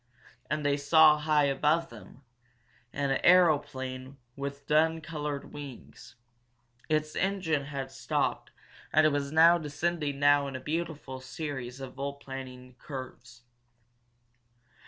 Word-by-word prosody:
And 150 +1 -2
they 145 0 +2
saw, 155 +1 +6
high 150 -1 +2
above 150 +4 +1
them, 115 +4 -14 0.7
an 140 -1 -1
aeroplane 135 -7 +2 0.2
with 140 0 -6
dun 160 +2 +3
colored 150 -2 -5
wings. 140 -4 -10 0.7
Its 155 0 0
engine 180 -7 0
had 135 -2 -5
stopped 130 -3 -2 0.4
and 155 0 +5
it - - +6
was 140 -1 -1
descending 160 -2 +2
now 145 0 +4
in 135 - -6
a - - -4
beautiful 150 -2 -4
series 130 -2 -6
of 130 -1 -8
volplaning 135 -2 -7
curves. 125 -3 -9
145 Hz, 115 wpm, -29 LUFS, 135-155 Hz, 0.7 s, saw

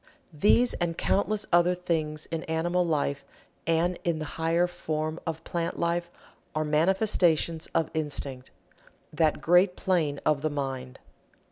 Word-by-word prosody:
These 210 +10 +4
and 170 -1 -2
countless 210 +1 0
other 175 +1 +5
things 155 -4 -2
in 165 -1 -2
animal 175 +3 0
life, 145 -4 -1 0.4
and 170 +2 +1
in 170 -2 0
the 155 - -4 0.2
higher 165 +2 +3
form 155 -2 -3
of 160 0 -4
plant 170 -1 -3
life, 170 0 -1 0.5
are 155 0 0
manifestations 165 0 +2
of 165 -1 +1
Instinct 140 -4 -3 0.6
that 155 0 +1
great 180 +2 +4
plane 160 -6 0
of 150 -2 +2
the 155 - 0
mind. 135 -3 -4
165 Hz, 135 wpm, -27 LUFS, 155-175 Hz, 0.6 s, other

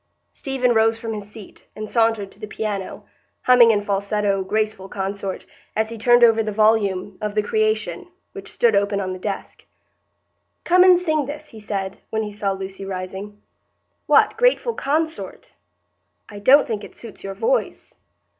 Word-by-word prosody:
Stephen 260 -3 -1
rose 225 0 +3
from 225 -1 -5
his 205 -1 -7
seat, 210 -2 -14
and 215 0 -6
sauntered 225 -3 +1
to - - -20
the 215 - -7
piano, 205 -3 -5 0.4
humming 250 -2 +7
in 205 -2 +2
falsetto, 200 0 0
"Graceful 215 0 -2
Consort," 195 0 -4 0.3
as 220 0 0
he 230 - -7
turned 240 +2 +5
over 225 -1 +6
the 215 -1 -3
volume 205 -3 +1
of 210 -1 -3
"The 210 - +2
Creation," 215 - -1 0.2
which - - -10
stood 475 - +2
open 200 0 +1
on 185 -1 -3
the 185 - -8
desk. 195 +1 -6 1.0
"Come 360 +1 +5
and 365 -1 +6
sing 310 -6 0
this," 300 +1 -8
he 220 - -12
said, 195 -2 -5
when 220 0 -1
he 210 - -5
saw 205 -1 -2
Lucy 195 0 -7
rising. 195 +2 -7 0.6
"What, - - +4
'Graceful - - +2
Consort'? 315 0 -3 0.7
I 205 - -10
don't 270 +8 +6
think 215 -3 -4
it - - -12
suits 230 -3 -12
your 195 0 -6
voice." - - -2
215 Hz, 165 wpm, -21 LUFS, 200-235 Hz, 1.0 s, humming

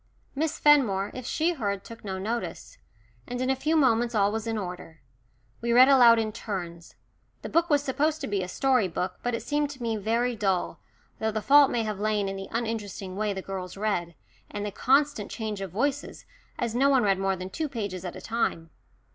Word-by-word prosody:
Miss 310 +2 -1
Fenmore, 225 -10 +4
if 255 -2 -7
she 330 +3 +1
heard, 200 - -3
took 230 - -12
no 190 -2 -4
notice. 235 - -5 0.5
And 245 0 -4
in 255 +1 +1
a - - +1
few 305 +5 0
moments 240 -5 +3
all 200 -1 +3
was 220 +1 -3
in 225 -1 -1
order. 180 -4 -7 0.6
We 235 0 0
read 255 +3 +8
aloud 245 -4 +7
in 220 -1 0
turns 175 -6 -6 0.5
the - - -5
book 335 +1 +2
was 290 -2 +3
supposed 295 +3 0
to - - -3
be 205 -2 -1
a 180 - -3
story 255 +1 +2
book, 180 +1 -4
but 245 -1 -1
it - - -5
seemed 295 0 0
to 265 -3 -8
me 225 -1 -1
very 230 +4 0
dull, 195 -4 -1 0.4
though 220 - 0
the 215 0 -2
fault 285 +5 +6
may 235 - 0
have 215 -2 -4
lain 210 -1 0
in 195 - -3
the 195 0 -6
uninteresting 215 -5 -4
way 210 +1 -1
the 190 -1 -5
girls 190 -1 -6
read, 175 -5 -2 0.3
and 205 0 -4
the 205 - -3
constant 270 -2 +2
change 215 -3 -4
of 195 - -4
voices, 280 - -2 0.3
as 235 -2 -2
no 270 +4 +3
one 265 -3 +4
read 195 -2 +2
more 195 0 +1
than 185 +1 -7
two 310 +5 -3
pages 200 -8 -4
at 180 - -6
a - - -9
time. 170 -8 -2
220 Hz, 215 wpm, -27 LUFS, 195-260 Hz, 0.6 s, read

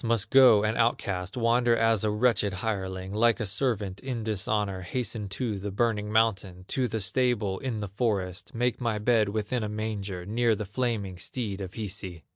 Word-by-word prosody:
must 115 -2 0
go 125 -6 +7
an 110 +1 +1
outcast, 100 -4 0
Wander 120 0 +3
as 115 -2 +3
a 110 - +2
wretched 105 -2 +2
hireling, 95 -2 -3
Like 115 +1 +3
a 110 - -1
servant 100 -2 -1
in 125 -4 -4
dishonor, 105 -2 -1
Hasten 110 +1 -3
to 105 +1 -3
the 100 +2 -4
burning 105 0 0
mountain, 95 -5 +1
To 130 -2 +1
the 110 0 -3
stable 110 -2 0
in 120 -5 -3
the 105 - -3
forest, 100 -2 -2
Make 125 +2 0
my 115 -3 0
bed 110 -1 +2
within 110 +4 -2
a 105 - -2
manger, 105 -4 -4
Near 115 +2 +2
the 105 0 -4
flaming 105 -4 -2
steed 105 -1 -4
of 90 -2 -6
Hisi!" 95 -5 -5
105 Hz, 180 wpm, -27 LUFS, 100-115 Hz, -, go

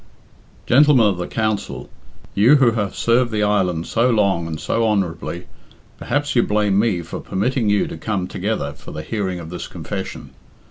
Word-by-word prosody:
"Gentlemen 135 -2 +5
of 95 -4 +1
the 90 - -3
Council, 110 -2 -2 0.5
you 115 +9 +5
who 130 -5 +4
have 105 -3 -2
served 120 +1 +2
the 105 -1 0
island 90 -5 +1
so 115 +2 +1
long 100 -7 +1
and 80 -2 -5
so 115 - 0
honourably, 90 -4 -2 0.5
perhaps 145 +3 -1
you 120 - +5
blame 105 -2 +1
me 100 -6 +1
for - - -7
permitting 115 +3 -1
you 105 -1 +2
to - - -7
come 100 -4 -2
together 90 -8 -3
for - - -13
the 75 0 -6
hearing 95 -2 -3
of 80 -1 -9
this 90 - -6
confession. - - -6
105 Hz, 175 wpm, -20 LUFS, 90-115 Hz, 0.5 s, Gentlemen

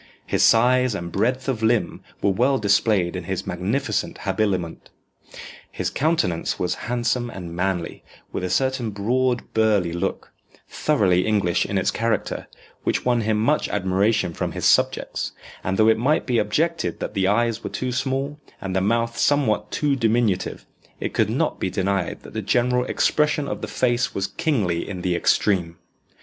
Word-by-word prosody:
His - - 0
size 125 0 +4
and 85 -3 -5
breadth 125 +8 0
of 125 -5 -1
limb 115 0 +1 0.2
were 100 - +4
well 125 +7 +2
displayed 100 -4 +2
in 90 -2 -5
his 95 +1 -3
magnificent 100 +10 -2
habiliment. 95 -6 -1 0.8
His - - -3
countenance 140 - 0
was 90 - 0 0.2
handsome 120 0 0
and 90 -6 -7
manly, 90 -2 -2 0.3
with - - -4
a 90 - -1
certain 130 +1 0
broad 120 +5 -1
burly 105 -6 +2
look, 85 - -3 0.4
thoroughly 95 -12 +2
English 100 -5 +1
in 100 - -1
its 95 0 +1
character, 115 -2 -2 0.4
which - - -1
won 120 -2 +2
him 110 0 +1
much 145 +8 +1
admiration 100 0 +1
from - - -3
his - - -3
subjects; - - +1 0.3
and 95 +1 -1
though 110 - +5
it 110 0 +4
might 145 +6 +2
be 120 -3 +1
objected 160 +10 0
that - - -4
the 95 -2 +1
eyes 115 +2 +1
were - - -3
too 130 -1 -3
small, 135 +3 -2 0.2
and 95 -1 -4
the 95 - +2
mouth 115 +3 0
somewhat 110 -8 +2
too 145 -2 0
diminutive, 115 -5 0 0.3
it - - -3
could - - +2
not - - -1
be 95 - -1
denied 95 -2 -1
that - - -12
the 110 - -2
general 125 +4 +1
expression 150 +1 +1
of - - -4
the - - -4
face 125 0 0
was 95 - 0
kingly 105 - -1
in 90 -3 -5
the 90 -1 +1
extreme. 85 -2 +1
110 Hz, 165 wpm, -23 LUFS, 95-125 Hz, 0.8 s, though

